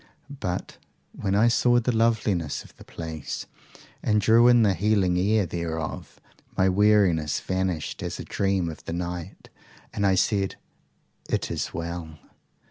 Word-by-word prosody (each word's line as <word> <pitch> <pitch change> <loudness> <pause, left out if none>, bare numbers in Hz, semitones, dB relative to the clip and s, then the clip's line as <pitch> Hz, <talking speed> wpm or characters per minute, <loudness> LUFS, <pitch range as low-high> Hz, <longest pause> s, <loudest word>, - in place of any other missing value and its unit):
But 90 0 -4 0.3
when 100 -1 -2
I 110 +3 +5
saw 120 +1 +4
the 120 0 -1
loveliness 105 -9 +1
of - - -18
the - - -14
place, 80 -3 -6 0.6
and 105 -1 +2
drew 115 +3 +5
in 120 -1 +6
the 100 -3 +3
healing 95 -1 +2
air 105 +2 +2
thereof, 80 -2 -5 0.4
my 95 - +4
weariness 95 -6 +3
vanished 95 -4 -2
as - - -4
a - - -6
dream 95 -3 0
of 80 -2 -7
the - - -4
night, 90 +1 -6 0.4
and 100 - -2
I 95 -1 +4
said, 95 0 +1 0.7
IT - - -1
IS - - -3
WELL. 85 -2 -5
95 Hz, 145 wpm, -25 LUFS, 85-105 Hz, 0.7 s, in